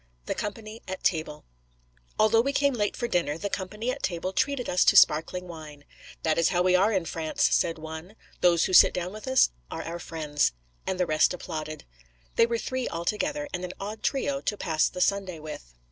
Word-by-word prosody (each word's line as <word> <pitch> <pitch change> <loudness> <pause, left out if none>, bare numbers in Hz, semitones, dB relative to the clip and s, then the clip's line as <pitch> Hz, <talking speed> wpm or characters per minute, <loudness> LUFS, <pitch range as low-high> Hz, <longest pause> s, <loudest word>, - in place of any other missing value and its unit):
THE - - -1
COMPANY 215 +1 -6
AT 190 0 -6
TABLE 155 -3 -1 0.7
ALTHOUGH 220 +1 +5
we 275 +3 -1
came 280 0 +2
late 210 -4 -1
for 240 - -2
dinner, 170 -8 0
the 200 +4 -4
company 210 +6 -3
at - - -6
table 185 +1 -2
treated 280 +3 0
us 180 - +3
to - - +5
sparkling 180 +4 +4
wine. 155 -4 -10 0.4
'That 160 0 +2
is 165 - +4
how 180 -1 +1
we 185 0 +4
are 195 +4 +4
in 190 -5 0
France,' 160 -1 0
said 165 -1 +1
one. 160 +5 -8 0.2
'Those 170 -2 +4
who 185 - -3
sit - - +7
down 180 +1 -3
with 215 +4 -9
us 260 0 +4 0.2
are - - -5
our 170 +1 -5
friends.' 150 - -1 0.3
And 185 - -2
the 180 - +3
rest 155 +2 +2
applauded. 155 -3 -6 0.5
They 230 - +5
were 235 0 0
three 255 +2 -3
altogether, 285 - -2
and 180 - -3
an 180 0 -5
odd 210 +2 -6
trio 275 0 -1
to 210 - -2
pass 160 -5 +1
the 180 - -5
Sunday 195 -3 +1
with. - - -9
180 Hz, 205 wpm, -27 LUFS, 160-215 Hz, 0.7 s, sit